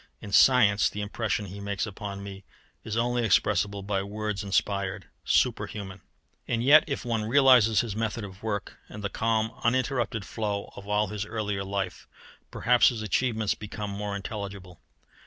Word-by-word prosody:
In 100 - -9
science, 110 -4 +5
the 105 - -5
impression 105 0 -2
he 100 +1 -8
makes 100 0 -2
upon 100 -1 -7
me 100 -1 -9 0.4
is 110 +1 -4
only 120 +1 +1
expressible 100 -1 +1
by 100 0 -1
the 95 - -4
words 105 0 -3
inspired, 100 -1 -1 0.2
superhuman. 100 -2 0 0.5
And 115 0 0
yet 150 +4 +8
if 140 -3 -4
one 115 -3 -1
realizes 125 -4 +5
his 110 -4 -5
method 110 0 -2
of 95 -1 -10
work, 105 -3 -4
and 105 - -9
the 100 - -1
calm, 110 0 0
uninterrupted 120 -3 0
flow 105 -3 -4
of 100 - -10
all 105 0 +1
his 105 -1 -3
earlier 105 -2 -3
life, 95 0 -4 0.4
perhaps 125 +1 +4
his 115 -4 -5
achievements 110 0 0
become 105 -1 -6
more 100 0 -4
intelligible. 100 -3 -7
105 Hz, 160 wpm, -27 LUFS, 100-115 Hz, 0.5 s, yet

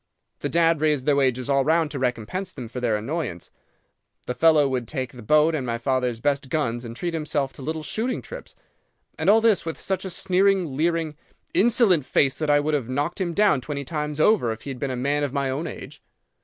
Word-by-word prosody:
The - - -3
dad 165 -2 +3
raised 150 -4 +1
their 145 - +3
wages 130 -2 +1
all 140 -1 +3
round 160 +1 +2
to 140 - -4
recompense 130 - -2
them 125 -4 -7
for 120 +3 -6
the 120 -3 +1
annoyance. 115 - -4 0.7
The 125 - -2
fellow 155 -1 +4
would 125 -3 -2
take 130 -4 -3
the 125 - -11
boat 150 +7 +3
and 150 -4 -1
my 115 -2 -2
father's 125 -1 -1
best 140 +1 -1
gun 125 -6 -1
and 115 -1 -8
treat 170 +6 -3
himself 150 -4 -2
to - - -12
little 155 +3 -4
shooting 235 +9 -2
trips. - - -10 0.6
And - - +2
all 220 +2 +6
this 220 -4 +3
with 165 -1 -5
such 190 -1 -2
a 190 - -4
sneering, 185 -3 +1
leering, 160 0 0 0.4
insolent 215 - +4
face 135 -2 +2
that 155 -1 -1
I 145 0 +5
would 150 +1 -1
have 130 -5 -1
knocked 145 +8 -2
him 170 -3 -2
down 200 -10 +3
twenty 140 +1 -5
times 150 0 -3
over 155 - +3
if 110 0 -7
he 140 - -5
had 130 - -7
been 140 - -2
a 130 - -2
man 140 +4 0
of 140 -2 -2
my 140 -2 0
own 145 +5 -3
age. - - -9
145 Hz, 225 wpm, -24 LUFS, 130-165 Hz, 0.7 s, all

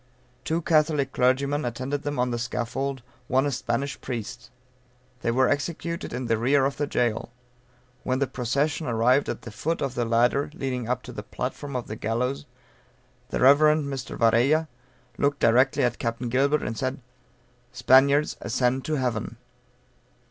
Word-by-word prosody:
Two 165 +1 -1
Catholic 155 -4 +2
clergymen 140 +4 +1
attended 130 +4 -3
them 145 -1 -3
on 125 0 +1
the 120 - -2
scaffold, 125 +3 -3 0.2
one 130 +2 +2
a 145 - 0
Spanish 125 +2 -2
priest. 120 0 -6 0.7
They - - -1
were 130 +2 +3
executed 170 +3 -2
in 125 +1 -4
the 115 -2 +1
rear 135 +3 +3
of 135 0 -2
the 145 - -1
jail. 115 -4 -1 0.7
When 130 - -1
the 140 - +1
procession 140 +5 -1
arrived 125 +4 +2
at - - -4
the 115 - -8
foot 160 +9 -2
of 135 -3 -2
the 120 - -1
ladder 120 +5 +2
leading 125 -6 -3
up 125 - -1
to 125 - -9
the 110 - -6
platform 130 +6 -5
of 125 - -2
the 110 - -6
gallows 120 +5 -2 0.8
the - - -2
Rev. 140 +3 +7
Mr. 150 -4 +1
Varella 125 +8 +3 0.5
looking 140 0 +2
directly 130 +3 +3
at 120 -1 0
Capt. 115 +1 -2
Gilbert, 135 -1 +1
said, 130 +4 -3 0.7
"Spaniards, 135 +4 +4
ascend 125 +2 0
to 155 - -1
heaven." 125 -5 -2
130 Hz, 155 wpm, -25 LUFS, 120-140 Hz, 0.8 s, Rev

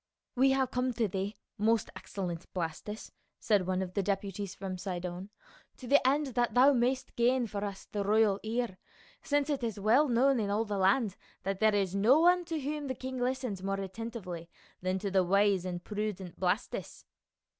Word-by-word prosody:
"We 265 +2 +5
have 265 -1 +1
come 250 0 0
to 225 -1 +1
thee, 195 +2 -3 0.2
most 220 +1 +2
excellent 175 -4 -5
Blastus," 180 +5 -4 0.3
said 200 -5 +2
one 185 0 0
of 185 -1 -7
the 200 - +1
deputies 200 0 -3
from 185 -2 -5
Sidon, 180 0 -5 0.5
"to - - -10
the 285 +3 +5
end 280 -1 +1
that 240 +1 +1
thou 265 +3 +7
mayst 255 +1 0
gain 245 +1 +3
for 205 -2 -4
us 200 -2 -5
the 205 -1 -3
royal 210 -1 +3
ear, 225 -3 -2 0.4
since 290 -1 +1
it 285 -3 -1
is 225 -3 -2
well 235 +9 +4
known 260 +1 +3
in 205 -2 -1
all 210 +3 +1
the 205 -2 -2
land 200 +2 +2 0.3
that 195 0 -2
there 215 -1 +4
is 195 -3 +1
no 220 +9 +5
one 355 +1 +4
to 325 -2 -3
whom 295 +1 -3
the 260 - -2
king 260 +1 -5
listens 250 -6 -2
more 195 +1 -2
attentively 190 -4 -6 0.3
than 185 +1 0
to 200 +1 -3
the 190 -1 +4
wise 195 0 +3
and 175 -1 -4
prudent 210 -4 -4
Blastus." 190 +5 -2
210 Hz, 190 wpm, -31 LUFS, 190-250 Hz, 0.5 s, thou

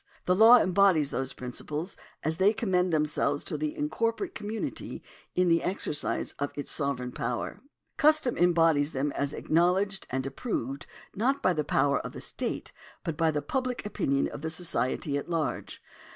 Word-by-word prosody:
The 180 - +3
law 225 +5 +8
embodies 185 - +3
those 135 0 -1
principles 150 +7 -4 0.3
as 160 +1 0
they 195 +3 +4
commend 185 -5 +1
themselves 150 -2 0
to - - -5
the 305 +1 -3
incorporate 295 - -1
community 215 +1 -5 0.3
in 180 0 +3
the 165 -1 +4
exercise 175 -5 0
of 145 0 -1
its 145 - -4
sovereign 140 -4 -1
power. 120 0 -3 0.4
Custom 305 -5 +4
embodies 165 -4 +3
them 140 +2 -1
as 140 0 -2
acknowledged 185 +6 +1
and 130 +1 -2
approved 135 - -4 0.3
not 260 +7 0
by 185 - +4
the 155 -2 -1
power 140 -1 +2
of - - -7
the - - -7
state, - - -4 0.3
but 165 - -3
by 165 +1 +2
the 150 -2 -1
public 255 - -2
opinion 140 -9 0
of - - -8
the 160 - -2
society 145 -4 -1
at 145 - -9
large. 165 -3 -2
165 Hz, 165 wpm, -28 LUFS, 145-205 Hz, 0.4 s, law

